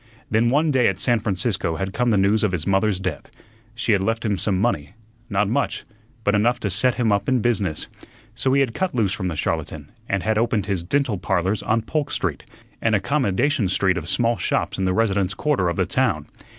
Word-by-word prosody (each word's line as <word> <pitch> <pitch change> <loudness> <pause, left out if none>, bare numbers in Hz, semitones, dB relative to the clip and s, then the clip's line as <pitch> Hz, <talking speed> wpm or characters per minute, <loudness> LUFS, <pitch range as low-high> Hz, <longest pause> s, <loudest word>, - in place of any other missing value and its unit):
Then 110 +2 +3
one 150 +4 +2
day 130 -3 +3
at 95 -1 -1
San 120 +2 +2
Francisco 95 -4 -1
had 95 +3 -3
come 125 0 +1
the 110 - +3
news 100 +3 +3
of 100 -3 +1
his 85 -2 -2
mother's 100 0 +1
death; 95 -4 -4 0.5
she 115 0 0
had 100 -2 +3
left 115 +3 -1
him 105 -2 +1
some 95 0 0
money 95 -5 -1 0.3
not 100 -1 +1
much, 130 +7 -1 0.4
but 105 - +2
enough 120 +4 +2
to 100 - -1
set 125 +6 +2
him 115 -4 +1
up 100 +7 +1
in 130 -1 +3
business; 105 -9 -1 0.5
so 125 +3 0
he 140 - +4
had 130 -4 0
cut 190 -2 -2
loose 105 -5 +1
from 95 -4 -3
the 85 - -3
charlatan - - -3 0.2
and 95 -1 0
had 110 0 +1
opened 115 -4 0
his 95 -3 -1
"Dental 120 0 0
Parlors" 95 +3 0
on 110 0 0
Polk 150 +4 -2
Street, 80 -7 -2 0.4
an 110 -1 +2
"accommodation 130 - +1
street" 95 0 +1
of 85 -2 -3
small 115 +2 +2
shops - - -1
in 95 - +1
the 95 - +1
residence 100 -4 +1
quarter 135 -13 +1
of 85 - -2
the - - +2
town. - - 0
105 Hz, 215 wpm, -22 LUFS, 95-120 Hz, 0.5 s, he